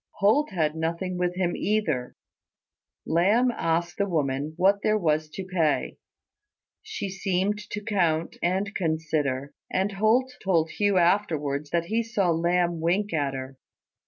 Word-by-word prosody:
Holt 220 +10 +3
had 160 -6 0
nothing 170 +3 -2
with 180 0 0
him 180 -2 0
either. 160 -13 -1 0.9
Lamb 210 +9 +3
asked 170 -3 -1
the 200 0 +1
woman 145 -2 -1
what 195 +3 +3
there 215 0 +2
was 155 -4 0
to 185 +5 -6
pay. 170 -5 0 0.8
She 435 - -5
seemed 195 +1 -1
to 210 - -5
count 170 -7 0
and 190 +4 0
consider; 155 -5 -1 0.2
and 190 +2 0
Holt 220 +6 +2
told 165 -5 +2
Hugh 205 -2 +1
afterwards 155 -6 +1
that 170 +1 0
he 225 +6 0
saw 210 -6 0
Lamb 170 +1 +1
wink 185 +4 0
at 140 -3 0
her. 130 0 -7
175 Hz, 140 wpm, -26 LUFS, 160-200 Hz, 0.9 s, Holt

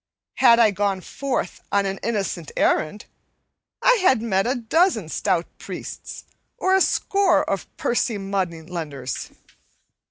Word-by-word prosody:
Had 235 -3 +6
I 225 -3 +5
gone 200 -1 0
forth 265 -3 -3
on 200 0 +2
an 195 0 -3
innocent 195 -7 -2
errand, 155 +7 +1 0.8
I - - +5
had 265 -10 +4
met 200 -2 0
a 255 - +1
dozen 240 - +1
stout 175 -1 0
priests - - -8 0.3
or 375 - +1
a 385 - +4
score 395 0 +2
of 195 - -2
pursy 235 -2 0
money 190 -4 -3
lenders. 150 -7 -5
200 Hz, 130 wpm, -23 LUFS, 185-250 Hz, 0.8 s, Had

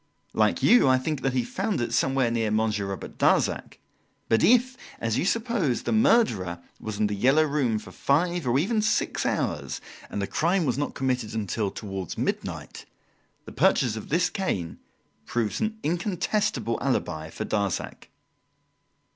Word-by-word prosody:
Like - - +2
you, 245 - +6
I 130 0 +5
think 140 +2 -2
that 135 -1 0
he 125 - +2
found 195 - -2
it 120 -1 -2
somewhere 130 0 +2
near 115 -2 0
Monsieur 110 -2 0
Robert 95 -1 -7
Darzac. - - +1 0.5
But 115 - +3
if, 250 +2 +4 0.2
as 115 -1 -1
you - - 0
suppose, 220 - 0
the - - -2
murderer 220 - +3 0.2
was 110 -2 -5
in 105 - +3
The 105 - -1
"Yellow 135 +9 +4
Room" 140 -7 +1
for 105 - -9
five, 170 +2 0
or 120 +2 +3
even 215 - +1
six 215 - 0
hours, - - -2 0.3
and - - -4
the 100 - 0
crime 170 - +1
was 125 - +1
not 145 +2 -3
committed 125 -5 -1
until 105 -1 -1
towards 95 -4 -6
midnight, - - -4 0.6
the - - -9
purchase 120 -5 +2
of 110 - -7
this 175 +3 +2
cane 95 - -3 0.5
proves 115 - -1
an 220 0 -1
incontestable 180 - -1
alibi 80 - -1
for - - -5
Darzac." 100 -3 -2
130 Hz, 160 wpm, -26 LUFS, 110-180 Hz, 0.6 s, you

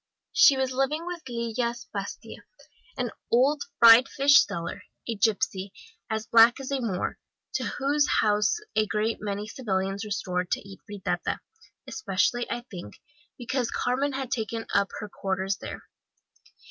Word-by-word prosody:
She 275 - +7
was 265 -1 0
living 270 +5 0
with 350 -1 -5
Lillas 235 0 -2
Pastia, 200 0 -6 0.6
an 245 -2 -2 0.2
old 280 +5 +3
fried 230 +2 +8
fish 280 +1 +6
seller, 170 0 -5 0.3
a 235 - -1
gipsy, 200 -2 0 0.4
as 220 0 -2
black 230 +2 +6
as 270 0 -6
a 275 -2 0
Moor, 200 -6 -2 0.3
to - - -1
whose 290 +1 +1
house 210 - +2 0.2
a 215 0 +2
great 215 +2 0
many 205 0 -3
civilians 195 -4 -2
resorted 180 -4 -2
to 200 - -4
eat 195 - -11
fritata, 205 -2 -2 0.5
especially, 240 - 0
I 240 - -2
think, 175 - -9 0.4
because 245 0 -2
Carmen 270 +3 0
had 265 -1 -4
taken 225 -1 -2
up 200 -1 +3
her 210 - -5
quarters 190 -1 -2
there. - - -8
230 Hz, 145 wpm, -27 LUFS, 200-260 Hz, 0.6 s, fried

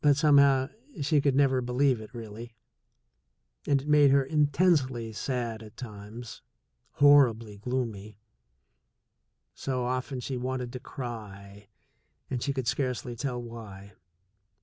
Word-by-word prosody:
But 145 -2 +5
somehow 140 -3 +5 0.3
she 150 0 +3
could 140 -2 +2
never 135 -2 +3
believe 125 0 +1
it 110 - -11
really, 115 0 -9 1.1
and 140 -1 +2
it - - -10
made 150 -1 +6
her 140 0 +4
intensely 145 -5 +1
sad 115 0 -3
at 105 -1 -13
times, 110 0 -9 0.5
horribly 120 -7 +4
gloomy. 110 -4 -4 1.4
So 130 -2 -3
often 130 +1 -2
she 130 +1 -4
wanted 125 0 -3
to 125 - -5
cry, 105 -6 -8 0.6
and 125 -2 -2
she 140 - -1
could 130 -2 -3
scarcely 125 -1 -2
tell 125 0 -3
why. 110 -4 -10
125 Hz, 125 wpm, -28 LUFS, 115-140 Hz, 1.4 s, made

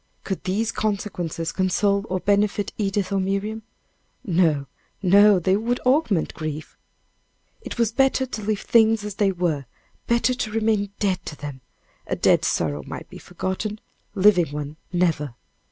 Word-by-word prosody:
Could 190 -2 -4
these 215 +5 0
consequences 180 -7 -2
console 200 +2 +1
or 185 - 0
benefit 205 +1 +1
Edith 200 -2 -1
or 195 - +1
Miriam? 200 +3 -2 0.6
No, 165 -6 +2 0.4
no, 200 +2 +6
they 185 +2 +2
would 235 +4 -1
augment 255 - +2
grief. 155 -1 -6 0.9
It - - -7
was 230 -2 +2
better 265 +2 +2
to 235 -4 -6
leave 210 0 -1
things 225 -2 +3
as 210 - -4
they 200 -2 +3
were 170 -6 -1 0.4
better 235 +2 +2
to 220 -3 -3
remain 215 -2 +1
dead 185 -4 0
to 150 - -5
them 145 -3 -8 0.5
a - - -1
dead - - +3
sorrow 75 -2 0
might - - -8
be - - -9
forgotten 210 +3 -4 0.4
living 190 -4 +5
one 145 0 -5 0.2
never! 160 -7 0
200 Hz, 150 wpm, -23 LUFS, 175-215 Hz, 0.9 s, no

